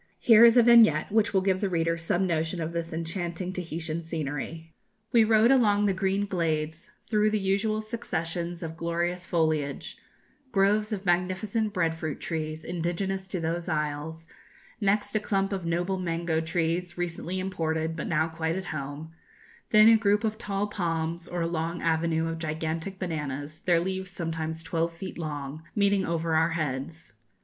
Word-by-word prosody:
Here 225 Hz, -1 st, +7 dB
is 235 Hz, +1 st, +8 dB
a 240 Hz, -, +8 dB
vignette, 225 Hz, -9 st, +6 dB
which 220 Hz, +1 st, +3 dB
will 190 Hz, -, +3 dB
give 185 Hz, -1 st, +1 dB
the 200 Hz, -, +1 dB
reader 165 Hz, -1 st, +1 dB
some 170 Hz, +3 st, 0 dB
notion 165 Hz, 0 st, -1 dB
of 165 Hz, 0 st, -3 dB
this 170 Hz, 0 st, -3 dB
enchanting 170 Hz, +2 st, -3 dB
Tahitian 165 Hz, -2 st, -4 dB
scenery: 160 Hz, +1 st, -5 dB, 0.4 s
"We 230 Hz, -2 st, +6 dB
rode 220 Hz, +2 st, +5 dB
along 210 Hz, -6 st, +4 dB
the 200 Hz, -, +2 dB
green 195 Hz, +2 st, 0 dB
glades, 160 Hz, -3 st, -2 dB, 0.2 s
through 210 Hz, -1 st, +4 dB
the 215 Hz, -, +1 dB
usual 210 Hz, +2 st, 0 dB
successions 175 Hz, -6 st, -3 dB
of 160 Hz, 0 st, -5 dB
glorious 175 Hz, +2 st, -2 dB
foliage; 155 Hz, -4 st, -1 dB, 0.5 s
groves 210 Hz, +2 st, +2 dB
of 200 Hz, -2 st, -3 dB
magnificent 185 Hz, +5 st, 0 dB
bread 170 Hz, -5 st, +1 dB
fruit 155 Hz, -2 st, -4 dB
trees, 155 Hz, -1 st, -4 dB
indigenous 180 Hz, +3 st, -2 dB
to 185 Hz, -1 st, -3 dB
those 170 Hz, +2 st, -2 dB
isles; 150 Hz, +1 st, -3 dB, 0.6 s
next 205 Hz, +2 st, +1 dB
a -, -, +4 dB
clump 195 Hz, -1 st, 0 dB
of 185 Hz, -3 st, -3 dB
noble 175 Hz, +3 st, 0 dB
mango 170 Hz, -2 st, -1 dB
trees, 170 Hz, +2 st, -1 dB
recently 175 Hz, +1 st, -3 dB
imported, 160 Hz, -4 st, -1 dB
but 160 Hz, -, -4 dB
now 160 Hz, -1 st, +2 dB
quite 160 Hz, 0 st, -2 dB
at 190 Hz, 0 st, -4 dB
home; 145 Hz, +2 st, -6 dB, 0.6 s
then 215 Hz, 0 st, +7 dB
a 225 Hz, 0 st, +8 dB
group 210 Hz, 0 st, +2 dB
of 220 Hz, 0 st, -1 dB
tall 200 Hz, -1 st, -1 dB
palms, 170 Hz, -4 st, -2 dB
or 175 Hz, -1 st, -3 dB
a -, -, 0 dB
long 165 Hz, +1 st, -2 dB
avenue 165 Hz, 0 st, +1 dB
of 165 Hz, 0 st, -4 dB
gigantic 160 Hz, +4 st, -3 dB
bananas, 150 Hz, -4 st, -4 dB
their 175 Hz, -1 st, +3 dB
leaves 190 Hz, +1 st, -3 dB
sometimes 160 Hz, -2 st, -4 dB
twelve 165 Hz, +1 st, -1 dB
feet 175 Hz, +2 st, -8 dB
long, 145 Hz, -2 st, -5 dB
meeting 200 Hz, -1 st, +3 dB
over 165 Hz, -1 st, -1 dB
our 160 Hz, +1 st, +4 dB
heads. 155 Hz, -4 st, -3 dB
170 Hz, 165 wpm, -27 LUFS, 160-195 Hz, 0.6 s, is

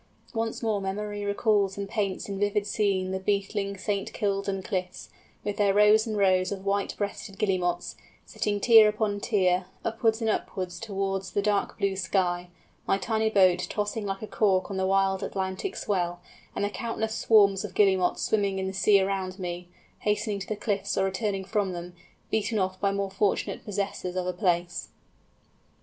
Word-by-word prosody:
Once 225 Hz, 0 st, -2 dB
more 215 Hz, -3 st, 0 dB
memory 205 Hz, +1 st, -3 dB
recalls 200 Hz, -1 st, +1 dB
and 200 Hz, 0 st, -3 dB
paints 200 Hz, -2 st, -2 dB
in 200 Hz, -1 st, -4 dB
vivid 205 Hz, 0 st, +1 dB
scene 200 Hz, -3 st, 0 dB
the 190 Hz, -, -2 dB
beetling 200 Hz, 0 st, -1 dB
St. 200 Hz, +1 st, -2 dB
Kildan 195 Hz, -1 st, -1 dB
cliffs, 185 Hz, -2 st, -4 dB, 0.3 s
with 205 Hz, 0 st, -3 dB
their 200 Hz, -1 st, +3 dB
rows 210 Hz, +2 st, +5 dB
and 215 Hz, -1 st, -2 dB
rows 185 Hz, -2 st, +3 dB
of 195 Hz, -1 st, -5 dB
white 200 Hz, 0 st, 0 dB
breasted 200 Hz, -1 st, -4 dB
Guillemots, 180 Hz, -4 st, 0 dB, 0.3 s
sitting 205 Hz, -1 st, -2 dB
tier 220 Hz, 0 st, +7 dB
upon 210 Hz, -1 st, -1 dB
tier, 185 Hz, -4 st, +1 dB, 0.2 s
upwards 225 Hz, 0 st, +1 dB
and 225 Hz, -, -1 dB
upwards 185 Hz, -4 st, -2 dB
towards 195 Hz, -3 st, -2 dB
the 205 Hz, -, +1 dB
dark 205 Hz, -1 st, 0 dB
blue 200 Hz, -2 st, 0 dB
sky; 180 Hz, -2 st, 0 dB, 0.4 s
my -, -, +3 dB
tiny 220 Hz, +3 st, 0 dB
boat 185 Hz, -4 st, +4 dB
tossing 210 Hz, +1 st, -2 dB
like 195 Hz, 0 st, -4 dB
a -, -, -4 dB
cork 195 Hz, -2 st, +1 dB
on 195 Hz, -, -3 dB
the 190 Hz, 0 st, +1 dB
wild 195 Hz, 0 st, +2 dB
Atlantic 190 Hz, -, -3 dB
swell, 175 Hz, -3 st, -1 dB, 0.4 s
and -, -, 0 dB
the 205 Hz, -, -2 dB
countless 220 Hz, -1 st, -3 dB
swarms 205 Hz, -3 st, +4 dB
of 205 Hz, -3 st, -7 dB
Guillemots 190 Hz, -3 st, +3 dB
swimming 200 Hz, -3 st, +1 dB
in 190 Hz, -, -2 dB
the 190 Hz, -, -3 dB
sea 200 Hz, +1 st, +4 dB
around 190 Hz, -1 st, -1 dB
me, 180 Hz, -1 st, -5 dB, 0.3 s
hastening 210 Hz, 0 st, 0 dB
to 195 Hz, -, -6 dB
the 215 Hz, -, -2 dB
cliffs 205 Hz, -1 st, -2 dB
or 195 Hz, -, +3 dB
returning 195 Hz, 0 st, -2 dB
from 195 Hz, -2 st, 0 dB
them, 175 Hz, 0 st, -7 dB, 0.4 s
beaten 220 Hz, 0 st, 0 dB
off 185 Hz, -1 st, -1 dB
by 200 Hz, -, +2 dB
more 200 Hz, -1 st, -2 dB
fortunate 195 Hz, 0 st, 0 dB
possessors 200 Hz, -3 st, -3 dB
of 185 Hz, -1 st, -1 dB
a 180 Hz, -, -1 dB
place. 175 Hz, -2 st, -1 dB
200 Hz, 175 wpm, -27 LUFS, 190-210 Hz, 0.4 s, tier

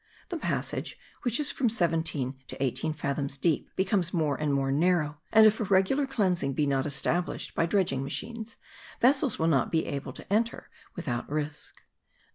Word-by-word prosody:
The 350 Hz, -, -3 dB
passage, -, -, -2 dB, 0.2 s
which 245 Hz, +1 st, +1 dB
is 295 Hz, -1 st, +2 dB
from 250 Hz, -4 st, +1 dB
seventeen 165 Hz, -, 0 dB
to -, -, -8 dB
eighteen 130 Hz, +3 st, -1 dB
fathoms 140 Hz, -2 st, -3 dB
deep, 160 Hz, +1 st, +1 dB
becomes 190 Hz, -2 st, +1 dB
more 155 Hz, -4 st, +1 dB
and 150 Hz, 0 st, -1 dB
more 135 Hz, -1 st, +1 dB
narrow,* 150 Hz, -1 st, +1 dB
and 220 Hz, 0 st, +7 dB
if 215 Hz, 0 st, +5 dB
a -, -, 0 dB
regular 200 Hz, +8 st, +2 dB
cleansing 185 Hz, -, 0 dB
be 150 Hz, +2 st, +1 dB
not 135 Hz, 0 st, +1 dB
established 150 Hz, +5 st, -1 dB
by 165 Hz, -, +1 dB
dredging 180 Hz, -8 st, +1 dB
machines, 225 Hz, +10 st, -5 dB, 0.4 s
vessels 265 Hz, 0 st, +3 dB
will 160 Hz, -, 0 dB
not 140 Hz, -7 st, +2 dB
be 160 Hz, -2 st, +1 dB
able 140 Hz, 0 st, -4 dB
to -, -, -6 dB
enter 230 Hz, +2 st, 0 dB, 0.2 s
without 125 Hz, -10 st, -3 dB
risk. 150 Hz, 0 st, -4 dB
165 Hz, 170 wpm, -28 LUFS, 140-215 Hz, 0.4 s, and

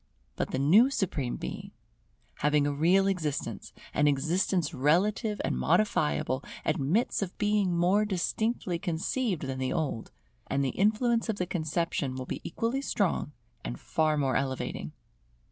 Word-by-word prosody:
But -, -, -2 dB
the -, -, -2 dB
new 185 Hz, -, +6 dB
Supreme 160 Hz, -, -1 dB
Being, -, -, -6 dB, 0.7 s
having 150 Hz, 0 st, +2 dB
a 145 Hz, -, 0 dB
real 175 Hz, +7 st, +4 dB
existence, 150 Hz, -, -2 dB, 0.2 s
an 150 Hz, -, +3 dB
existence 160 Hz, +3 st, +1 dB
relative 200 Hz, -, +1 dB
and -, -, 0 dB
modifiable, 155 Hz, -9 st, +1 dB, 0.2 s
admits 155 Hz, -, +1 dB
of 185 Hz, -2 st, -4 dB
being 205 Hz, -4 st, +1 dB
more 185 Hz, +5 st, +3 dB
distinctly 200 Hz, -1 st, -1 dB
conceived 180 Hz, -, -1 dB
than 135 Hz, -1 st, -3 dB
the 130 Hz, 0 st, -1 dB
old; 145 Hz, -8 st, -2 dB, 0.4 s
and 140 Hz, +1 st, 0 dB
the -, -, +1 dB
influence 225 Hz, -, +1 dB
of 220 Hz, -, +1 dB
the 180 Hz, -, -1 dB
conception 160 Hz, -5 st, -2 dB
will 130 Hz, 0 st, -5 dB
be -, -, -5 dB
equally 235 Hz, +4 st, -2 dB
strong 195 Hz, -, -1 dB, 0.3 s
and -, -, -5 dB
far 155 Hz, -1 st, +1 dB
more 135 Hz, -3 st, +1 dB
elevating. 135 Hz, -1 st, -2 dB
170 Hz, 145 wpm, -29 LUFS, 145-205 Hz, 0.7 s, new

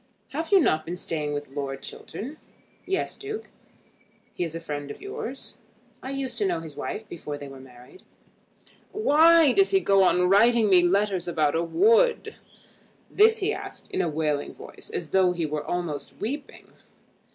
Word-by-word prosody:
"Have 320 Hz, +5 st, -4 dB
you 395 Hz, -, +7 dB
not 155 Hz, -, +2 dB
been 175 Hz, +3 st, -5 dB
staying 155 Hz, -4 st, -3 dB
with 145 Hz, -1 st, -5 dB
Lord 135 Hz, -1 st, -5 dB
Chiltern?" 275 Hz, +9 st, -7 dB, 0.5 s
"Yes, 385 Hz, 0 st, -1 dB
Duke." 430 Hz, +2 st, -7 dB, 0.8 s
"He -, -, -2 dB
is 165 Hz, -1 st, -4 dB
a -, -, -3 dB
friend 145 Hz, -3 st, -6 dB
of -, -, -8 dB
yours." 400 Hz, +1 st, -7 dB, 0.4 s
"I 260 Hz, -, -7 dB
used 265 Hz, -3 st, -3 dB
to 205 Hz, -, +1 dB
know 175 Hz, -3 st, -1 dB
his 160 Hz, -3 st, -9 dB
wife 215 Hz, 0 st, -5 dB
before 150 Hz, -5 st, -6 dB
they 145 Hz, -, -8 dB
were 135 Hz, -1 st, -11 dB
married." 125 Hz, -, -15 dB, 0.9 s
"Why 330 Hz, -5 st, +5 dB
does 390 Hz, +5 st, +4 dB
he 390 Hz, -, +4 dB
go 195 Hz, -, +3 dB
on 180 Hz, -1 st, +4 dB
writing 220 Hz, +2 st, +4 dB
me 180 Hz, -1 st, +7 dB
letters 190 Hz, 0 st, +1 dB
about 155 Hz, -4 st, +1 dB
a 165 Hz, -, +1 dB
wood?" 455 Hz, -, +3 dB, 0.8 s
This 445 Hz, +2 st, +5 dB
he 430 Hz, -, +1 dB
asked -, -, -8 dB
in 380 Hz, -, 0 dB
a 170 Hz, -, 0 dB
wailing 150 Hz, -2 st, -2 dB
voice, -, -, -11 dB
as 165 Hz, -4 st, -4 dB
though 185 Hz, -2 st, +3 dB
he 170 Hz, -2 st, -2 dB
were 150 Hz, 0 st, -3 dB
almost 170 Hz, -4 st, -4 dB
weeping. 275 Hz, +7 st, -6 dB
185 Hz, 175 wpm, -25 LUFS, -, 0.9 s, you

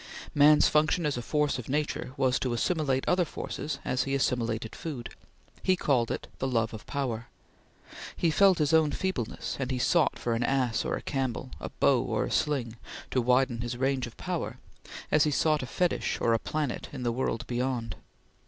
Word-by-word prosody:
Man's 150 Hz, +1 st, +6 dB
function 155 Hz, +2 st, +2 dB
as 150 Hz, -, +1 dB
a 120 Hz, -, -3 dB
force 150 Hz, +1 st, 0 dB
of 120 Hz, -, -8 dB
nature 145 Hz, -2 st, -2 dB
was 130 Hz, -1 st, +2 dB
to 125 Hz, -2 st, -1 dB
assimilate 135 Hz, 0 st, 0 dB
other 180 Hz, 0 st, +3 dB
forces 155 Hz, -1 st, -5 dB
as 125 Hz, -, +1 dB
he 135 Hz, 0 st, 0 dB
assimilated 115 Hz, -4 st, -1 dB
food. 140 Hz, -8 st, -6 dB, 0.5 s
He 185 Hz, -, +3 dB
called 125 Hz, -9 st, +1 dB
it -, -, -3 dB
the 135 Hz, -, 0 dB
love 115 Hz, -3 st, 0 dB
of 110 Hz, -, -9 dB
power. 120 Hz, -5 st, -3 dB, 0.9 s
He 170 Hz, -, +2 dB
felt 190 Hz, +3 st, +5 dB
his 150 Hz, 0 st, +1 dB
own 160 Hz, -2 st, +4 dB
feebleness, 185 Hz, -, -3 dB
and 130 Hz, -2 st, -2 dB
he 130 Hz, -, -1 dB
sought 165 Hz, +6 st, +2 dB
for 120 Hz, -, -1 dB
an 115 Hz, -, -1 dB
ass 125 Hz, -3 st, +1 dB
or -, -, 0 dB
a -, -, -6 dB
camel, 130 Hz, -2 st, -2 dB
a -, -, -5 dB
bow -, -, +3 dB
or -, -, -1 dB
a -, -, -5 dB
sling, 125 Hz, -6 st, 0 dB, 0.3 s
to 130 Hz, -, +2 dB
widen 125 Hz, -1 st, +2 dB
his 120 Hz, 0 st, -4 dB
range 130 Hz, -1 st, 0 dB
of 115 Hz, -, -13 dB
power, -, -, -3 dB, 0.5 s
as 150 Hz, -, +5 dB
he -, -, +2 dB
sought 155 Hz, +1 st, +2 dB
fetish 180 Hz, +6 st, 0 dB
or 115 Hz, -, +2 dB
a 115 Hz, -, +2 dB
planet 150 Hz, -2 st, -3 dB
in 130 Hz, -3 st, -6 dB
the 120 Hz, -, +1 dB
world 125 Hz, -1 st, -2 dB
beyond. 120 Hz, -4 st, -2 dB
130 Hz, 190 wpm, -28 LUFS, 120-150 Hz, 0.9 s, Man's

